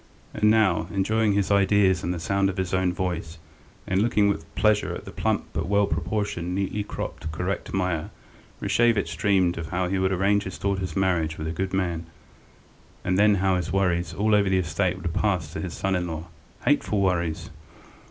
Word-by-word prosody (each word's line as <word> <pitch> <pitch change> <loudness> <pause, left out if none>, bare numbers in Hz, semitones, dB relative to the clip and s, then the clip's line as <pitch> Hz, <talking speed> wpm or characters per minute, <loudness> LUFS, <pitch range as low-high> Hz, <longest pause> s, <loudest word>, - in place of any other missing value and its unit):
And 105 - +3
now, 95 -7 +3
enjoying 105 +2 +1
his 100 0 0
ideas 100 -2 +4
and 85 - -2
the 90 - -3
sound 100 +3 +1
of 95 - -5
his 95 -1 -2
own 95 -1 +2
voice, 90 -2 -3 0.5
and 95 +1 +1
looking 105 -2 +3
with 90 -5 -2
pleasure 105 -1 +2
at - - -8
the - - -8
plump - - 0
but 80 +2 -2
well 100 +1 +3
proportioned, 90 +1 -2
neatly 100 +2 -1
cropped, 80 -5 -5
correct 90 +5 -3
Meier, 90 -4 -1 0.5
Rashevitch 115 -4 +2
dreamed 95 -5 +2
of 80 - -5
how 90 0 -1
he 95 0 0
would 95 0 +1
arrange 100 +2 +2
his 95 - -6
daughter's 95 -2 -2
marriage 85 -5 +1
with 80 - -5
a - - -1
good 95 +3 -3
man, 85 -3 -1 1.0
and 90 - +1
then 105 0 +5
how 95 0 +1
all 90 - +2
his 85 -3 -3
worries 90 -3 0
over 105 -1 +3
the 95 - +3
estate 90 +1 0
would 85 -3 -3
pass 90 -7 0
to - - -4
his 90 -3 -5
son 95 0 -1
in 90 -1 0
law. 80 -1 -5 0.4
Hateful 105 - +2
worries! 85 -4 0
95 Hz, 190 wpm, -25 LUFS, 85-100 Hz, 1.0 s, then